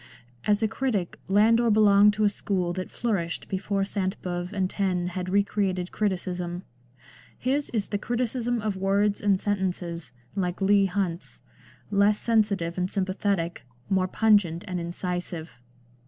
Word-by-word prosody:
As 210 +1 +3
a - - +4
critic 220 -5 -2
Landor 225 +4 +4
belonged 210 -1 +6
to 215 - 0
a 210 - +5
school 185 -3 -2
that 185 0 -4
flourished 190 -8 -2
before 195 +1 -1
Sainte 195 -1 -2
Beuve 175 0 -3
and 195 -3 0
Taine 185 -2 -1
had 180 0 -4
re 200 +2 +4
created 190 -3 -1
criticism. 180 -3 -2 0.7
His 280 +3 0
is 215 -4 -2
the 205 - -1
criticism 240 0 -1
of 210 -2 -1
words 200 +2 +1
and 200 -2 +3
sentences, 180 -5 -2 0.2
like 180 -2 -1
Leigh 200 0 +4
Hunt's 185 -2 -3 0.3
— - - -27
less 205 +1 +4
sensitive 200 -7 +1
and 180 +1 0
sympathetic, 190 -3 -1 0.3
more 190 -1 +2
pungent 200 -5 +3
and 180 -1 -2
incisive. 170 -5 -4
195 Hz, 145 wpm, -26 LUFS, 180-210 Hz, 0.7 s, belonged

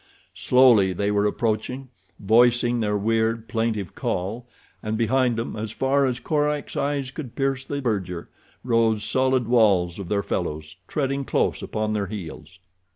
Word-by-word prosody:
Slowly 110 -1 +4
they 100 +3 -1
were 105 0 +2
approaching, 115 +5 -2 0.3
voicing 120 +3 +3
their 105 -2 0
weird, 115 +2 0
plaintive 110 -6 -2
call, 110 +7 -3 0.3
and 110 0 -2
behind 125 +1 +2
them, 115 +1 -4
as 110 0 -4
far 135 +3 +1
as 125 -1 -2
Korak's 150 +2 -1
eyes 140 -2 -1
could 135 -5 -8
pierce 135 -1 -1
the 140 0 -4
verdure, 95 -8 -2 0.4
rose 115 -3 +2
solid 130 -2 +1
walls 100 -7 +3
of 95 -3 -6
their 100 -1 0
fellows 75 +3 -4
treading 140 -1 -1
close - - 0
upon 110 0 -2
their 100 -2 -1
heels. 90 -3 -8
115 Hz, 150 wpm, -24 LUFS, 105-130 Hz, 0.4 s, Slowly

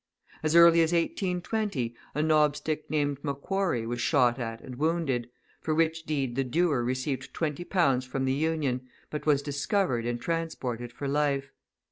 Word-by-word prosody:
As 155 +1 +1
early 170 0 +8
as 165 +1 +2
1820, 180 - -1 0.2
a 150 - +1
knobstick 155 0 +1
named 145 -2 0
M'Quarry 145 - -1
was 120 +1 -3
shot 125 -3 +3
at 115 -2 -4
and 125 -2 -9
wounded, 145 -6 0 0.3
for 155 - -1
which 165 0 +1
deed 135 -5 -1
the 135 - +1
doer 145 0 +1
received 130 +1 -3
twenty 160 +1 -2
pounds 140 -9 +2
from 130 +1 -3
the 130 - +1
Union, 140 -4 -1 0.2
but 150 0 -5
was 145 -2 +3
discovered 140 - 0
and 120 0 -2
transported 125 -7 -3
for 140 +4 -5
life. 140 -1 0
145 Hz, 155 wpm, -28 LUFS, 130-165 Hz, 0.3 s, early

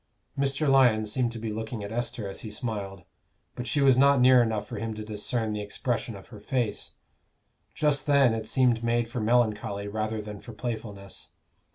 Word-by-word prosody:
Mr. 140 +2 0
Lyon 125 -6 +5
seemed 120 +3 0
to 115 - -7
be 110 -1 -4
looking 110 0 -5
at 100 - -6
Esther 120 -2 -3
as 95 - -7
he 110 - -7
smiled, 105 -4 -5 0.5
but 125 - -6
she 140 +5 +1
was 135 -2 +5
not 140 0 +6
near 125 0 +7
enough 110 -3 0
for - - -6
him 110 0 -3
to 110 0 -6
discern 110 +1 -2
the 105 - -3
expression 115 +2 -3
of 95 - -12
her 110 -4 -11
face. 120 +1 -2 0.8
Just 150 -2 +1
then 140 -5 +5
it 110 -1 -3
seemed 125 -3 +2
made 115 0 +1
for 120 +1 -4
melancholy 105 -3 +1
rather 110 +1 -2
than 105 -1 -7
for 120 - -11
playfulness. 105 -3 -6
115 Hz, 190 wpm, -27 LUFS, 105-125 Hz, 0.8 s, near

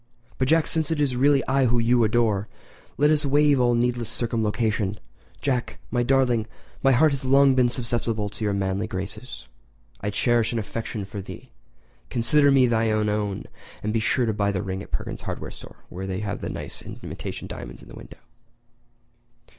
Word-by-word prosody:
"But, 130 - +2
Jack, 160 +2 +4
since 160 -2 -1
it 160 -2 -1
is 140 -4 +1
really 140 +2 +3
I 135 0 +3
whom 120 0 +2
you 120 +1 +3
adore, 110 -2 +1 0.5
let 150 +1 +4
us 150 0 +3
waive 145 0 +4
all 120 -1 +3
needless 120 -1 0
circumlocution. 110 -3 0 0.4
Jack—my 125 -2 -2
darling—my 120 0 +1
heart 150 +4 +5
has 140 -1 -3
long 135 +1 +5
been 125 -2 +3
susceptible 115 -3 -1
to 110 - -7
your 105 - +1
manly 100 +1 -1
graces. 100 +6 -6 0.5
I 105 - -2
cherish 120 +3 +1
an - - -1
affection 110 -1 -4
for 100 +1 -6
thee—consider 120 +4 -2
me 135 -2 +5
thine 110 -2 +1
own 105 -2 -2 0.4
and 105 +1 -1
be 115 - +2
sure 120 +3 +1
to 110 - 0
buy 100 -1 +1
the 100 0 -2
ring 95 0 -4
at - - -10
Perkins' - - -4
hardware - - -5
store - - -14
where 95 +2 -6
they 95 +1 -3
have 100 -1 -4
such - - -4
nice - - -6
imitation - - -7
diamonds - - -8
in - - -15
the - - -13
window." - - -12
120 Hz, 175 wpm, -24 LUFS, 105-130 Hz, 0.5 s, heart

